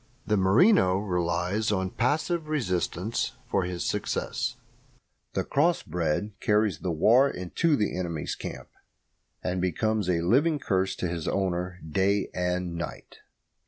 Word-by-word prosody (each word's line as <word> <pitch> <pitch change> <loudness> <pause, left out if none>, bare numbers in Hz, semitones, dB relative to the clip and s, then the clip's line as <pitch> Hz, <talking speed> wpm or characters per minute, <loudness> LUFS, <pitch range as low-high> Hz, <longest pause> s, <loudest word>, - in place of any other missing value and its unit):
The 105 - +2
merino 95 - +5
relies 90 +2 0
on 95 -2 -1
passive 155 +6 0
resistance 105 - -1
for 100 -5 0
his 90 -1 -3
success; - - -2 0.8
the - - 0
cross 165 +5 +2
bred 85 +4 -1
carries 105 -5 +2
the 90 - -3
war 115 - +5
into 135 - 0
the 105 -6 0
enemy's 85 -4 -3
camp, - - -7 0.7
and 90 0 -1
becomes 105 +2 0
a 85 -2 +2
living 140 - +3
curse 95 -7 0
to 90 - -2
his 85 -2 -4
owner 90 -1 -1
day 95 +5 +1
and 90 -1 -1
night. 85 -4 -7
95 Hz, 130 wpm, -27 LUFS, 90-110 Hz, 0.8 s, merino